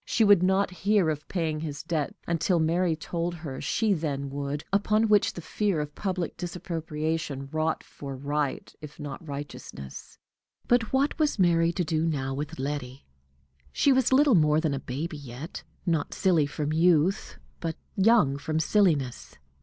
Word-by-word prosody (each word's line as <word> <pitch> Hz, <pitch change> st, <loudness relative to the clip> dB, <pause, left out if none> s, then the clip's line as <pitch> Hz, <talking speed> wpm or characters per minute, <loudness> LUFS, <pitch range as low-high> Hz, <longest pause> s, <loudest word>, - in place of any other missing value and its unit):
She 225 Hz, -, +1 dB
would 205 Hz, -4 st, +6 dB
not 190 Hz, +1 st, +2 dB
hear 190 Hz, -2 st, +2 dB
of 150 Hz, 0 st, -6 dB
paying 160 Hz, -4 st, -1 dB
his 150 Hz, -2 st, -5 dB
debts 160 Hz, -3 st, -2 dB
until 170 Hz, +2 st, +1 dB
Mary 165 Hz, +1 st, +2 dB
told 170 Hz, +2 st, -3 dB
her 155 Hz, -5 st, -6 dB
she 220 Hz, -3 st, +1 dB
then 140 Hz, -5 st, -2 dB
would, 140 Hz, +1 st, -3 dB
upon 215 Hz, +2 st, +3 dB
which 210 Hz, -2 st, +4 dB
the 175 Hz, -, -7 dB
fear 200 Hz, -3 st, 0 dB
of 150 Hz, 0 st, -4 dB
public 185 Hz, -3 st, -3 dB
disapprobation 160 Hz, -4 st, -3 dB
wrought 155 Hz, 0 st, 0 dB
for 140 Hz, -1 st, -8 dB
right 145 Hz, +1 st, -2 dB
if 150 Hz, 0 st, -10 dB
not 145 Hz, -3 st, -6 dB
righteousness. 140 Hz, -, -8 dB, 0.5 s
But 240 Hz, -2 st, +2 dB
what 275 Hz, +4 st, +1 dB
was 300 Hz, -5 st, +2 dB
Mary 170 Hz, -3 st, +3 dB
to 180 Hz, -, 0 dB
do 155 Hz, -1 st, 0 dB
now 135 Hz, -5 st, -1 dB
with 150 Hz, +4 st, -5 dB
Letty? 135 Hz, -1 st, -4 dB, 0.7 s
She 275 Hz, -, +3 dB
was 260 Hz, -1 st, +2 dB
little 275 Hz, 0 st, +5 dB
more 150 Hz, -4 st, +4 dB
than 160 Hz, -3 st, 0 dB
a 135 Hz, -, -2 dB
baby 150 Hz, +6 st, -4 dB
yet, 140 Hz, +3 st, -8 dB, 0.2 s
not 165 Hz, -4 st, 0 dB
silly 170 Hz, -7 st, +3 dB
from 150 Hz, +1 st, -3 dB
youth, 165 Hz, -, +2 dB, 0.2 s
but 165 Hz, -1 st, -3 dB, 0.2 s
young 190 Hz, -10 st, +4 dB
from 155 Hz, +2 st, -1 dB
silliness. 160 Hz, -, +1 dB
160 Hz, 160 wpm, -27 LUFS, 145-185 Hz, 0.7 s, would